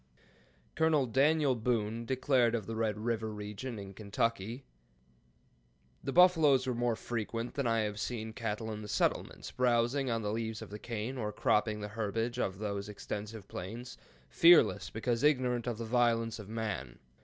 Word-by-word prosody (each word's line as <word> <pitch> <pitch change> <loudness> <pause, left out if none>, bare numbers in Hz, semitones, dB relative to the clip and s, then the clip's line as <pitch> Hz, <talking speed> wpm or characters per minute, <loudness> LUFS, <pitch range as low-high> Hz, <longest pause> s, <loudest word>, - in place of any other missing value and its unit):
Col. 160 -4 +3
Daniel 140 +3 +3
Boone 115 -1 -1
declared 130 -3 +2
of 110 -4 -3
the 115 - -5
Red 110 -2 0
River 110 0 -2
region 105 +4 -6
in 100 -1 -8
Kentucky, 115 +3 -2 1.4
"The 135 - -2
buffaloes 160 -6 +5
were 130 - 0
more 120 -1 0
frequent 115 +1 -4
than 140 -3 -1
I 115 -1 +2
have 105 -1 -3
seen 110 -1 -4
cattle 110 -1 -3
in 105 - -6
the 105 - -7
settlements, 105 - -1
browzing 125 +2 +1
on 115 -1 -1
the 105 - -1
leaves 110 0 -3
of 105 - -12
the 105 - -6
cane, 115 +4 -4
or 105 -2 -2
cropping 105 0 +1
the 105 - -5
herbage 115 +3 -2
of 95 -5 -1
those 100 -1 -4
extensive 105 0 -6
plains, 115 +7 -7 0.3
fearless 170 - +5
because 115 +1 -1
ignorant 125 -5 +2
of 120 -3 -2
the 115 - -4
violence 115 -1 +1
of 105 -1 -9
man. 105 - -4
115 Hz, 165 wpm, -32 LUFS, 105-125 Hz, 1.4 s, buffaloes